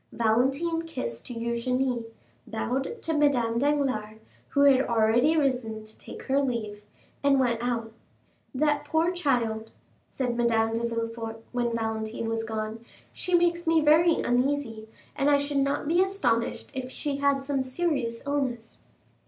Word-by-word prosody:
Valentine 265 +9 +1
kissed 115 - -5
Eugénie, 240 +1 -1 0.4
bowed 265 - -3
to 325 - -1
Madame 250 -6 +2
Danglars, 260 -7 0 0.3
who 280 - +1
had 275 -2 +6
already 235 +6 +3
risen 250 -7 0
to 215 0 -8
take - - -10
her 275 +1 +1
leave, 230 -6 -2 0.4
and 280 -1 +4
went 235 -3 +1
out. 230 -2 -2 0.6
"That 295 +2 +2
poor 325 +2 +1
child," 240 -10 0 0.4
said 250 -3 -2
Madame 225 -2 +2
de 230 +1 0
Villefort 230 -1 -4
when 240 -1 -1
Valentine 220 0 -3
was 225 0 -1
gone, 220 0 -4 0.3
"she 360 -2 0
makes 345 0 +2
me 325 0 +5
very 315 +3 +5
uneasy, 245 -3 -1 0.3
and 280 0 +2
I 290 - +5
should 285 0 -2
not 280 +1 0
be 345 +3 +3
astonished 260 -13 0
if 260 -1 -4
she 280 +1 -3
had 280 -1 +1
some 275 -1 -1
serious 260 -4 -2
illness." 260 -5 -2
250 Hz, 145 wpm, -27 LUFS, 230-285 Hz, 0.6 s, had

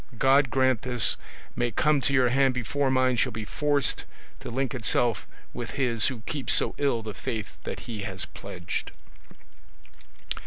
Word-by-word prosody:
God 135 +2 +4
grant 130 -2 +2
this 125 -2 +3 0.4
may 120 0 0
come 145 +6 +2
to 140 - +1
your 130 -3 +4
hand 135 0 +3
before 135 +3 0
mine 130 -1 +2
shall 130 +2 +2
be 110 -1 -5
forced 145 +5 +1 0.3
to - - -7
link 130 +3 -2
itself 120 -2 0 0.3
with 120 -1 -5
his 120 -5 +3
who 130 -5 -3
keeps 140 +4 +1
so - - +3
ill 135 -6 +1
the 110 -1 -6
faith 110 +2 -5
that - - -5
he 115 -3 -6
has 95 -2 -3
pledged. - - -6
125 Hz, 160 wpm, -27 LUFS, 115-135 Hz, 0.4 s, God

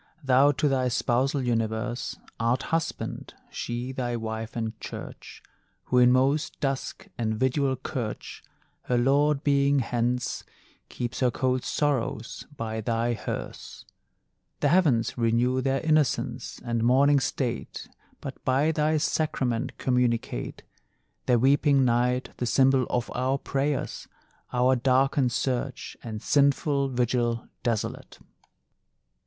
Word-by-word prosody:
Thou 135 +2 +5
to 150 - +1
thy 130 -2 +1
spousal 130 +3 +1
universe 115 0 -2 0.2
Art 115 +3 +1
Husband, 165 -1 -2 0.2
she 120 +2 -4
thy 125 -2 -2
Wife 110 0 -5
and 110 -1 -2
Church; - - -9 0.4
Who 125 - +2
in 125 0 +6
most 135 +4 +1
dusk 135 +7 -3
and 110 -1 0
vidual 130 +3 +1
curch, 125 -4 -5 0.4
Her 125 - +1
Lord 140 +3 +3
being 140 0 +3
hence, 120 0 -1 0.5
Keeps 120 -1 -4
her 125 - +3
cold 130 +1 0
sorrows 130 -5 -2
by 110 -1 -3
thy 115 +2 0
hearse. 110 - -6 0.8
The 145 - +3
heavens 140 -10 +2
renew 120 +3 +2
their 135 +1 0
innocence 155 -3 0
And 115 -1 -1
morning 140 +4 +5
state 120 - -3 0.3
But - - -8
by 135 +5 +2
thy 155 0 +1
sacrament 135 -5 -1
communicate; 125 - -1 0.6
Their 125 - +5
weeping 140 +2 +4
night 125 +1 +1
the 125 - -2
symbol 130 0 +3
of 120 -1 -1
our 130 +2 0
prayers, 140 +1 -2 0.4
Our 125 +1 +3
darkened 130 +1 +2
search, 130 +2 -2
And 110 -3 -6
sinful 140 0 +2
vigil 120 -2 0
desolate. 115 -3 -3
125 Hz, 120 wpm, -26 LUFS, 120-140 Hz, 0.8 s, in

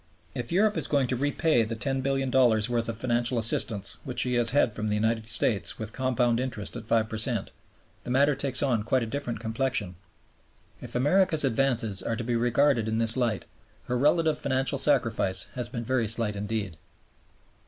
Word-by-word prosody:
If 120 -1 -5
Europe 210 +4 +2
is - - -1
going 140 -3 +1
to 130 - 0
repay 145 +1 +1
the 115 +1 -2
$10,000,000,000 130 -2 +1
worth 115 -1 -1
of 115 - -4
financial 120 +1 0
assistance 110 -2 +1
which - - 0
she 125 - 0
has 120 -1 +4
had 125 -5 +2
from 105 0 -3
the 105 - 0
United 110 +1 -1
States 110 -2 0
with 110 -1 -7
compound 125 -2 0
interest 125 -5 -4
at 115 -2 -8
5 115 -1 +1
per 110 0 -5
cent, 110 -2 -2 0.5
the - - -8
matter 140 +3 +3
takes 135 -1 +1
on 125 -6 +1
quite 120 +3 0
a - - -2
different 120 -1 -5
complexion. 115 -3 -2 0.9
If - - -7
America's 160 +4 +3
advances 120 -6 +1
are 115 - -2
to 120 - -5
be 120 +1 -2
regarded 120 0 +2
in 110 0 -1
this 115 0 +2
light, 120 -5 -1 0.4
her 125 - -3
relative 150 +4 +2
financial 135 0 0
sacrifice 115 -9 +2
has 125 -1 -4
been 115 -2 -5
very 120 -2 0
slight 110 -1 -1
indeed. 100 -4 -4
120 Hz, 185 wpm, -27 LUFS, 110-135 Hz, 0.9 s, has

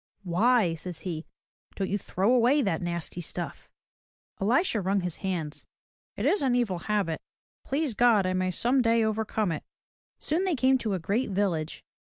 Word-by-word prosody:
"Why,'' 195 +1 +3
says 165 0 -6
he, 165 -3 -5 0.5
"don't 195 - -1
you 205 +2 -1
throw 195 +5 +1
away 255 +4 +4
that 165 -6 0
nasty 175 0 -4
stuff?" 170 -2 -6 0.7
Elisha 230 - +2
wrung 195 +1 +1
his 180 -2 -3
hands. 175 -6 -4 0.5
"It - - -2
is 410 - +3
an 260 -3 +2
evil 215 -8 0
habit. 195 -4 -1 0.4
Please 280 -1 -1
God, 220 -3 +4
I 185 - 0
may 185 0 0
some 245 +8 +2
day 230 -1 +3
overcome 220 -2 0
it." 155 - -3 0.6
Soon 325 +5 0
they 370 -4 +1
came 260 0 +3
to 215 -5 -1
a - - 0
great 205 +10 0
village. 185 -6 -1
200 Hz, 170 wpm, -28 LUFS, 175-245 Hz, 0.7 s, away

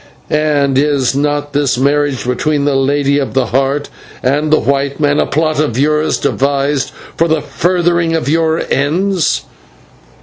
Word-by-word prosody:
and 145 -3 +1
is 140 -3 +1
not 145 0 -1
this 140 -3 +1
marriage 140 0 0
between 140 +4 0
the 145 - +1
Lady 140 +1 +1
of 135 - -4
the 130 -2 +2
Heart 135 +4 0 0.4
and 145 +4 +1
the 155 - +5
white 140 +3 -1
man 145 -1 +2
a - - +1
plot 155 0 0
of 145 -7 0
yours 150 +3 +1
devised 140 0 0 0.3
for 165 - +1
the 160 -1 +1
furthering 170 0 0
of 160 - -2
your 160 +1 +1
ends?" 170 +5 0
145 Hz, 155 wpm, -14 LUFS, 140-155 Hz, 0.4 s, the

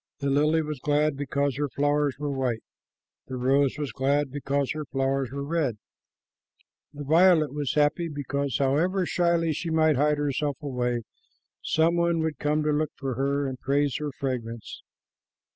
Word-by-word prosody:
The 140 -1 -1
lily 150 +3 +3
was 150 -3 -5
glad 150 +1 +1
because 140 -1 -1
her 145 -1 -1
flowers 145 0 +1
were 145 0 -3
white. 130 -4 -1 0.6
The 130 - -5
rose 135 +2 +2
was 145 -2 -3
glad 140 +1 0
because 140 -1 -1
her 155 0 -3
flowers 135 -1 -1
were 140 +2 -5
red. 145 -6 -1 1.1
The 145 -1 -8
violet 160 -1 +4
was 145 -2 -2
happy 150 +3 +2
because, 140 -2 -2
however 165 +8 +1
shyly 170 -2 +1
she 165 +3 -4
might 160 -3 +3
hide 150 +2 +2
herself 145 -1 -1
away, 125 -5 -2 0.6
some 165 +2 +2
one 170 0 +2
would 160 -1 -2
come 150 +1 +1
to 150 - +1
look 150 0 0
for 135 -2 -3
her 140 +3 0
and 130 -2 -4
praise 140 0 +1
her 150 -1 -3
fragrance. 120 -4 -4
145 Hz, 160 wpm, -26 LUFS, 135-155 Hz, 1.1 s, violet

